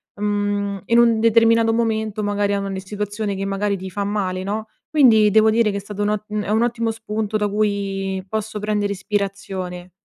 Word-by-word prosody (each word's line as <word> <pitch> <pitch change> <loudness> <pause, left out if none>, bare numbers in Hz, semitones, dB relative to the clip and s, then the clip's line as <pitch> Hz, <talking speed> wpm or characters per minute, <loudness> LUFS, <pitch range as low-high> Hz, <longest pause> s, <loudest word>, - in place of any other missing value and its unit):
mhmm, 205 -1 -1
in 235 - +3
un 235 -2 +5
determinato 230 0 +4
momento, 220 -2 -1
magari, 205 0 0
a 200 - -1
ogni 195 -1 -4
situazione 205 +1 -4
che 195 +1 -3
magari 200 +1 -1
ti 190 0 -7
fa 200 +2 -2
male, 195 -2 -2
no? 215 +3 -4 0.2
Quindi, 235 -9 +5
devo 220 +1 +5
dire 225 0 +3
che 200 - -2
è - - -2
stato 205 +1 -7
un 205 - +1
o 210 -1 -1
mhmm, 210 0 -2
è - - -5
un 220 +2 +3
ottimo 230 -1 0
spunto 220 -1 -2
da 210 - 0
cui 195 -2 -1
posso 215 +1 -3
prendere 210 -1 -1
ispirazione. 195 -3 -4
205 Hz, 195 wpm, -21 LUFS, 200-220 Hz, 0.2 s, un